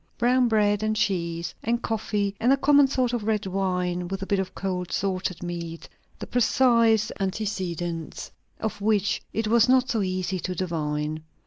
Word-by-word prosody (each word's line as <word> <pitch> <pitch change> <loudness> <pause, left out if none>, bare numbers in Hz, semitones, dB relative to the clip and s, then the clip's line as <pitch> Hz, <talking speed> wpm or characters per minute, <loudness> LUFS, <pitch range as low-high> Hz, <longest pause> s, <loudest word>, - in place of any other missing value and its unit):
Brown 250 +1 +3
bread, 205 -2 +2
and 215 0 0
cheese, 170 -5 -1
and 235 +2 -1
coffee, 205 -2 -1
and 240 +3 +3
a 275 - +5
common 285 0 +5
sort 255 -2 0
of 240 -3 -1
red 215 -2 0
wine; 180 -2 -1
with 195 +1 -4
a - - -3
bit 200 0 0
of 185 -1 -4
cold 180 -2 -3
salted 185 -2 -2
meat, 170 -1 -6 0.3
the - - -6
precise 230 -2 +3
antecedents 185 -5 -3 0.3
of 215 -2 -4
which 205 -1 +1
it 225 - -1
was 235 +2 +4
not 260 +1 +4
so 225 - +1
easy 185 -1 -2
to 185 +1 -4
divine. 155 -3 -2
200 Hz, 170 wpm, -25 LUFS, 180-225 Hz, 0.3 s, a